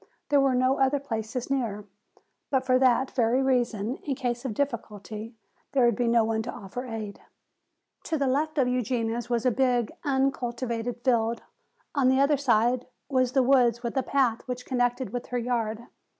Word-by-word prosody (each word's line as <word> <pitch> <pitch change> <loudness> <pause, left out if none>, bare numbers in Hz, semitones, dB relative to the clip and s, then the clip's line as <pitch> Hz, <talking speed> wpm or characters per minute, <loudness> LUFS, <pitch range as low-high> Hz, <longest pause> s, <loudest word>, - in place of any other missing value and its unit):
There 285 -1 +4
were 270 -2 +3
no 255 +2 +2
other 270 +1 +3
places 240 -1 -4
near. 220 -7 -1 0.6
But 265 -2 +1
for 255 -1 +3
that 260 0 +3
very 245 +2 +2
reason 245 -3 0
in 275 - -4
case 245 -1 -3
of 230 -5 -3
difficulty 220 -4 -4 0.4
there 260 -3 +4
would 235 -2 +3
be 240 +1 0
no 230 -1 +4
one 220 0 0
to 235 - -5
offer 245 +6 -7
aid. 215 -3 -6 0.8
To 320 - -1
the 280 - 0
left 300 +4 0
of 265 -3 +3
Eugenia's 240 -1 -1
was 235 -1 0
a 250 - +4
big, 245 -2 +1
uncultivated 245 -3 -1
field. 230 -2 +1 0.5
On 275 -4 +2
the 260 +1 +3
other 280 +1 +4
side 245 -2 +2 0.2
was 255 -2 +1
the 265 -2 +4
woods 245 -2 +3
with 235 - -2
the 265 - +1
path 255 -4 +1
which 250 0 -5
connected 245 0 -1
with 245 - -4
her 250 - -2
yard. 230 -2 -2
245 Hz, 180 wpm, -27 LUFS, 230-265 Hz, 0.8 s, There